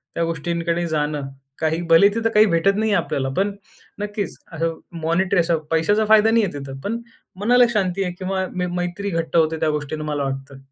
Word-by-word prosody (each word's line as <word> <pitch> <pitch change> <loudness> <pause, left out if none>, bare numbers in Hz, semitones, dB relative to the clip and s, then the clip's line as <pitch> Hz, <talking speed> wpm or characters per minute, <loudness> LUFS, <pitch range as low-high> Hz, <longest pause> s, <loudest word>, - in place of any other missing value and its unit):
त्या 170 - 0
गोष्टींकडे 170 +1 -2
जाणं. 150 -2 -1 0.3
काही 160 +1 0
भले 165 +4 +7
तिथं 225 0 +1
काही 210 +1 +7
भेटत 195 +1 +2
नाही 220 +1 0
आहे 175 - +2
आपल्याला. 135 -5 -2
पण 200 +2 +2 0.5
नक्कीच 205 -2 -4 0.2
असं 165 0 -2 0.2
मॉनिटरी 180 +4 +2
असं 170 -1 +2
पैशाचा 205 +7 +2
फायदा 220 0 +6
नाही 230 0 +4
आहे - - -5
तिथं. 135 -1 -8
पण 225 +7 -3 0.4
मनाला 245 +4 +5
शांती 195 -2 0
आहे 180 -2 -3
किंवा 190 0 -1
मै 180 0 -1
मैत्री 180 +3 -3
घट्ट 165 0 -2
होते 160 0 +2
त्या 155 - +1
गोष्टीन 150 +1 -4
मला 150 -2 -2
वाटतं. 135 0 -5
170 Hz, 190 wpm, -21 LUFS, 160-200 Hz, 0.5 s, भले